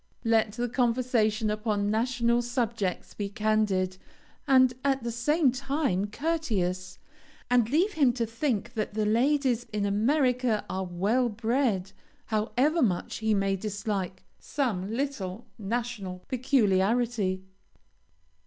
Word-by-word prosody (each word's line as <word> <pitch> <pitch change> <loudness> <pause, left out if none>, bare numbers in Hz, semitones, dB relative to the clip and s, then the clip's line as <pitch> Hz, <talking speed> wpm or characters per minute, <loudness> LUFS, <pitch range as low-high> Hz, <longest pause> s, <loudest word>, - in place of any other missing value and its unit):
Let 225 -2 +2
the 240 +2 -2
conversation 230 -3 +1
upon 210 -1 -1
national 235 +1 +1
subjects 235 -6 -2
be 205 -1 -4
candid, 205 -3 0 0.5
and 260 -2 +5
at 270 -3 +1
the 235 - -2
same 280 +5 +2
time 270 - -1
courteous, 200 - -2 0.5
and 240 -3 +4
leave 355 - +2
him 280 -6 +4
to 235 -2 -1
think 230 -1 -2
that 215 -3 -3
the 215 -1 +1
ladies 245 +2 +2
in 210 -1 -1
America 245 +1 +1
are 190 0 -3
well 205 +8 +1
bred, 220 -3 0 0.3
however 250 +9 +1
much 185 -9 0
he 220 -1 +1
may 195 0 +1
dislike 200 -2 -3 0.2
some 215 -9 -2
little 230 -6 -3
national 210 -4 -4
peculiarity. 225 -5 +1
225 Hz, 115 wpm, -28 LUFS, 205-255 Hz, 0.5 s, and